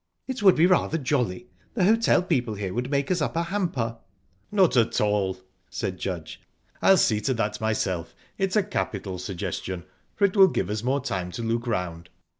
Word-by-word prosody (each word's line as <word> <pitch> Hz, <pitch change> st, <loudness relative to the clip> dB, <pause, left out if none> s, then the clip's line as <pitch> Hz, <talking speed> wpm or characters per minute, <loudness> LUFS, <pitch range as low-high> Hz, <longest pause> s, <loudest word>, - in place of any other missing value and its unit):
It 260 Hz, -3 st, -4 dB
would 190 Hz, -3 st, +7 dB
be 160 Hz, -, +5 dB
rather 180 Hz, -3 st, +2 dB
jolly. 125 Hz, -, -1 dB, 0.3 s
The 200 Hz, -, +1 dB
hotel 220 Hz, -3 st, +4 dB
people 125 Hz, -11 st, 0 dB
here 95 Hz, -2 st, -4 dB
would 125 Hz, +2 st, -2 dB
make 140 Hz, +3 st, 0 dB
us 175 Hz, -3 st, +1 dB
up 150 Hz, -, -1 dB
a 170 Hz, -, +1 dB
hamper." 170 Hz, -, -2 dB, 0.5 s
"Not 190 Hz, -7 st, +4 dB
at 115 Hz, -2 st, +3 dB
all," 105 Hz, -3 st, +1 dB, 0.3 s
said 95 Hz, -2 st, -4 dB
Judge. 85 Hz, -5 st, -5 dB, 0.4 s
"I'll 195 Hz, -, +6 dB
see 105 Hz, -9 st, +2 dB
to 130 Hz, +2 st, 0 dB
that 110 Hz, -2 st, -2 dB
myself. 95 Hz, -6 st, -1 dB, 0.2 s
It's 195 Hz, 0 st, -1 dB
a 210 Hz, -, +4 dB
capital 100 Hz, -, -3 dB
suggestion, 90 Hz, -1 st, -4 dB, 0.3 s
for 200 Hz, -, +3 dB
it 195 Hz, -, 0 dB
will 195 Hz, -2 st, +8 dB
give 105 Hz, -, -2 dB
us 105 Hz, 0 st, -2 dB
more 135 Hz, +4 st, 0 dB
time 95 Hz, -8 st, -3 dB
to 115 Hz, -, -4 dB
look 115 Hz, +2 st, -1 dB
round." 85 Hz, -6 st, -3 dB
120 Hz, 190 wpm, -25 LUFS, -, 0.5 s, will